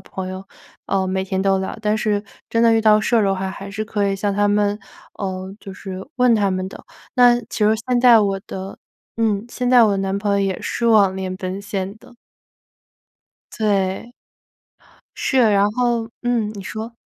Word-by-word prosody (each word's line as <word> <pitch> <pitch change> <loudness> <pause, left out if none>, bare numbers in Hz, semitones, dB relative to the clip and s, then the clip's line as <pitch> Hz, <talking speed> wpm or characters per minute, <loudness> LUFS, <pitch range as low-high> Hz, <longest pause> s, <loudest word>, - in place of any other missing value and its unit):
朋 190 -1 -7
友， 185 +1 -6 0.4
呃， 190 -1 0
每 190 0 -1
天 190 0 -2
都 195 0 +2
聊， 190 - -5
但 215 0 +1
是 210 -1 0 0.3
真 230 - +1
的 230 -1 +5
遇 225 - +3
到 215 -1 +5
事 240 - 0
儿 225 - +4
的 195 -1 +2
话， 190 0 -3
还 195 +1 -8
是 215 +2 -4
可 205 -2 -1
以 195 - -1
向 200 0 -1
他 205 0 +2
们 205 0 +1 0.4
呃， 190 -1 -5
就 195 - -9
是 190 0 -7
问 250 -2 +4
他 200 -2 +2
们 185 0 -2
的。 - - -12 0.3
那 245 -1 +5
其 230 - -8
实 210 0 +4 0.2
现 250 -1 +1
在 240 -2 +7
我 195 -2 0
的 190 +1 -7 0.4
嗯， 215 -2 0
现 250 +1 -2
在 245 -2 +7
我 200 -2 +2
男 195 0 -1
朋 205 0 -1
友 200 - +2
也 195 -2 -1
是 235 - -1
网 205 -4 +5
恋 185 -1 -4
奔 190 +1 -5
现 200 0 -4
的。 250 +1 -18 1.4
对。 200 +1 -1 1.0
是， 265 - 0
然 210 -4 +4
后 235 -1 0
嗯， 235 -3 0
你 200 - -7
说。 220 +3 -6
205 Hz, 205 characters per minute, -20 LUFS, 195-225 Hz, 1.4 s, 在